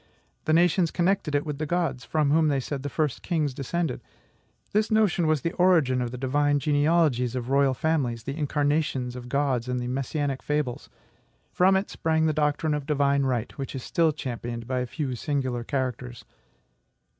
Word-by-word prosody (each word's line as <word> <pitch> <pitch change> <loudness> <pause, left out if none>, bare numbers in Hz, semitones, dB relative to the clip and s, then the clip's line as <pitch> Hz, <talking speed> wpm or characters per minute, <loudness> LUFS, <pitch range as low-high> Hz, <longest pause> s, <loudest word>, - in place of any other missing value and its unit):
The 155 - +2
nations 175 +1 +4
connected 175 -4 0
it 145 - +1
with 150 -2 -4
the 155 - -2
gods, 170 -7 -1
from 150 0 +1
whom 160 +1 +4
they 140 -2 +1
said 135 +1 -4
the 145 - -4
first 150 -1 -1
kings 155 -6 -1
descended. 140 +2 -2 0.7
This 215 +1 +2
notion 210 -7 +2
was 155 -3 +2
the 165 - -1
origin 165 -9 +3
of 120 - -2
the 125 - -7
divine 145 +3 +1
genealogies 145 -4 +2
of 125 0 -4
royal 140 -1 +3
families, 130 -7 -1
the 135 +3 -4
incarnations 145 -4 0
of 125 -1 -8
gods, 135 -3 0
and 125 0 -1
the 125 - -3
messianic 135 +2 -2
fables. 150 -5 -2 0.6
From 190 +2 +4
it 190 +2 -1
sprang 160 0 +1
the 155 - +2
doctrine 150 +1 +1
of 145 -2 -3
divine 140 -2 +2
right, 125 -3 -2
which 135 0 -5
is 130 - -5
still 165 -2 +2
championed 120 -5 -5
by 130 +1 -1
a 125 - -2
few 140 -1 -3
singular 130 -2 -2
characters. 125 -2 -4
145 Hz, 180 wpm, -26 LUFS, 130-160 Hz, 0.7 s, nations